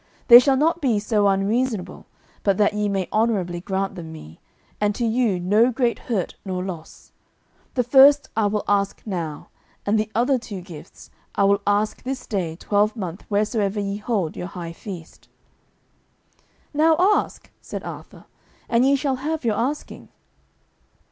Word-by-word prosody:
They 240 0 +12
shall 265 +1 +2
not 325 +4 +1
be 250 -7 +2
so 210 -1 +1
unreasonable 200 0 -1 0.3
but 200 -2 +1
that 210 -1 +3
ye 210 0 -1
may 195 -2 -1
honourably 195 -6 0
grant 195 +1 -2
them 170 -4 -8
me, 80 - -12 0.4
and 210 -1 +1
to 240 - -1
you 225 -5 +1
no 210 +7 +3
great 240 -1 0
hurt 205 -7 -1
nor 185 -2 -3
loss. 175 -4 -9 0.6
The 250 - +2
first 280 +4 +6
I 220 -2 +2
will 210 0 -1
ask 200 -1 0
now, 170 -7 -5 0.4
and 215 +2 +2
the 215 0 -1
other 250 +3 +2
two 205 -5 -7
gifts 170 -4 -13 0.2
I - - +2
will 200 0 +3
ask 205 +1 +1
this 260 0 -5
day 180 -6 -3
twelvemonth 205 -1 -1
wheresoever 210 0 0
ye 200 0 -2
hold 205 -7 -2
your 180 - -5
high 170 -3 -7
feast." 170 -3 -10 1.5
"Now 315 +2 +4
ask," 395 +4 +1
said - - -7
Arthur, - - -10 0.4
"and 235 +1 +3
ye 275 +1 +4
shall 270 -1 -1
have 305 +1 -3
your 220 -2 +1
asking." 265 +7 -4
210 Hz, 155 wpm, -22 LUFS, 190-245 Hz, 1.5 s, They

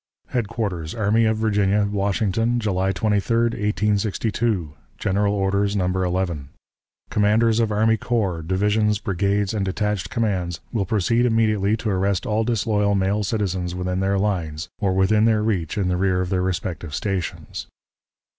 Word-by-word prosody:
_" - - -27
"HEADQUARTERS 100 -7 -2
ARMY 110 +1 +2
OF 110 0 +2
VIRGINIA, 105 -2 +2
WASHINGTON, 105 +4 0
July 95 -3 0
23, 105 +3 0
1862. 105 -3 -1 0.2
"(GENERAL 100 +1 +1
ORDERS, 100 0 0
No. 95 -2 +1
11.) 90 -5 -1 0.6
"Commanders 110 +2 +3
of 115 -2 +1
army 110 +2 +3
corps, 100 -9 -1
divisions, 105 +5 +1
brigades, 100 0 0
and 105 -3 -1
detached 105 +1 -2
commands 95 -7 -1
will 100 -5 0
proceed 115 +4 +2
immediately 110 -2 +2
to 110 -1 -2
arrest 95 0 0
all 110 +1 +1
disloyal 105 -3 +1
male 100 +2 +1
citizens 95 -4 -2
within 90 0 -2
their 100 +1 +1
lines, 90 -5 -2
or 100 -3 +1
within 105 +3 +3
their 110 -2 +3
reach 95 -7 -1
in 100 -3 +1
the 90 -1 0
rear 95 -1 +1
of 90 - -2
their 90 -1 +1
respective 85 -3 -3
stations. 95 -4 -4
100 Hz, 145 wpm, -22 LUFS, 95-110 Hz, 0.6 s, Commanders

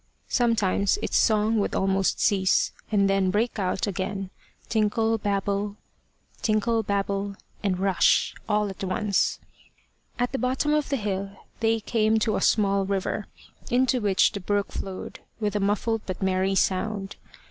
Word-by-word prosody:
Sometimes 225 - +2
its - - -2
song 220 0 +3
would 200 - -1
almost 195 0 +1
cease, 190 -2 +2 0.2
and 200 -2 +3
then 195 -1 +2
break 215 +3 0
out 190 0 0
again, 195 -1 -3 0.4
tinkle, 225 +1 +1
babble, 200 0 -1 0.7
and 200 -3 -1
rush, 195 -1 +3 0.2
all 210 -1 +1
at 195 - -8
once. 195 +1 0 0.8
At 245 0 0
the 265 - -2
bottom 260 +4 +1
of 300 -1 +1
the 280 - +1
hill 200 -2 -3 0.2
they 225 0 +2
came 220 0 +1
to 220 0 +1
a - - -1
small 200 -2 +3
river, 195 +1 -2 0.4
into 255 0 +2
which 200 -2 +3
the 205 - -5
brook 205 +1 -1
flowed 190 -1 -6 0.2
with 210 -2 -1
a - - +2
muffled 210 +3 0
but 185 - -4
merry 190 +1 +1
sound. 195 +1 -1
205 Hz, 140 wpm, -25 LUFS, 195-220 Hz, 0.8 s, song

